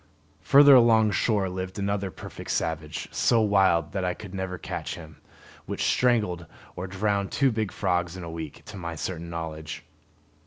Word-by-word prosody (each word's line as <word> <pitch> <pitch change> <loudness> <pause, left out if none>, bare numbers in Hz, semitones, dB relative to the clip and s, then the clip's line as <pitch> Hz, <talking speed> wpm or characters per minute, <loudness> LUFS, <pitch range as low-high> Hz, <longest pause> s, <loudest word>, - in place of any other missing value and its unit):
Further 140 0 +7
along 115 -4 +6
shore 100 -1 +1
lived 95 0 -5
another, 100 0 -1
a - - -7
perfect - - -10
savage, 80 -1 -2
so 115 - +3
wild 95 -6 +3
that 95 -1 -2
I 90 0 -1
could 100 -3 -10
never 95 -1 -4
catch - - -5
him, 80 -3 -12 0.5
which - - -3
strangled 105 -9 +1 0.3
or 90 +2 -5
drowned 100 +1 -1
two 135 -2 +2
big 110 -3 -2
frogs 90 0 -1
in 90 - -7
a 85 - -6
week, 80 -3 -7
to 105 - -9
my 85 -2 -5
certain 85 +1 -5
knowledge. 80 -2 -6
95 Hz, 170 wpm, -26 LUFS, 85-105 Hz, 0.5 s, Further